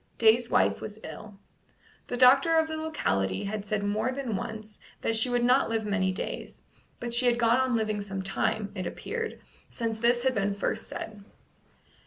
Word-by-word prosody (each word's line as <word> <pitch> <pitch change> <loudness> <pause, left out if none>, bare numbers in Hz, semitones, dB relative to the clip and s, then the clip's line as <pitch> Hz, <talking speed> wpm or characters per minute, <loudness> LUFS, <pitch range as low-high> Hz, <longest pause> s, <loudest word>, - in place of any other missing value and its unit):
Day's 230 +1 +4
wife - - +2
was 215 0 -7
ill. 205 -2 -9 0.7
The 245 - -3
doctor 270 +6 +6
of 320 0 +3
the 315 - -4
locality 95 - -1
had 205 +1 -3
said 205 0 -1
more 215 +5 0
than 260 -5 -3
once 215 +1 -6 0.2
that 225 - +1
she 225 +3 +2
would 245 -1 +1
not 250 +1 +4
live 225 -1 -1
many 200 -2 +1
days, 185 - -6 0.4
but 240 -1 -4
she 245 +1 +2
had 240 -1 +3
gone 235 0 +4
on 260 -2 +1
living 215 -2 0
some 195 -1 -4
time, 200 +2 -1
it 185 -3 -4
appeared, 455 - -4 0.3
since 230 -2 -3
this 240 +2 +2
had 260 -1 +2
been 200 -2 0
first 215 +2 -2
said. 210 -2 -7
225 Hz, 185 wpm, -28 LUFS, 205-250 Hz, 0.7 s, doctor